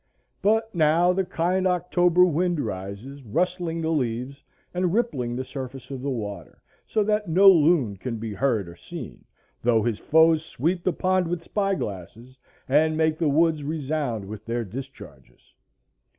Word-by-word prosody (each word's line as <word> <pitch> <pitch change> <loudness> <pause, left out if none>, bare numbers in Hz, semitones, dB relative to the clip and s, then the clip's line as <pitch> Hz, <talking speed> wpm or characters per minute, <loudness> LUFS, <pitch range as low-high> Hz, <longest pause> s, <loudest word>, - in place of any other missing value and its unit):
But 220 +2 +1
now 170 +2 +3
the 190 +1 +1
kind 185 +2 0
October 180 0 +3
wind 175 0 0
rises, 105 +5 -6
rustling 170 - -1
the 160 - 0
leaves 130 -1 -2 0.3
and 180 -1 0
rippling 140 - -1
the 130 - -3
surface 130 0 -8
of 135 -2 -5
the 140 - -2
water, 105 -6 -6 0.3
so 215 - +1
that 210 -2 0
no 190 +5 +5
loon 155 - +5
can 115 +4 -4
be 110 -1 -5
heard 110 -4 0
or 85 - -10
seen, - - -9 0.4
though 115 -2 +3
his 115 -2 -1
foes 160 0 +4
sweep 170 +5 -2
the 185 - +2
pond 185 +1 +1
with 170 0 -3
spy 195 0 0
glasses, 110 - -7 0.3
and 155 +3 +3
make 160 -1 +1
the 160 -3 +2
woods 160 +1 +2
resound 145 -7 -2
with 105 +1 -8
their 115 +1 -3
discharges. 125 - -11
155 Hz, 160 wpm, -25 LUFS, 120-175 Hz, 0.4 s, no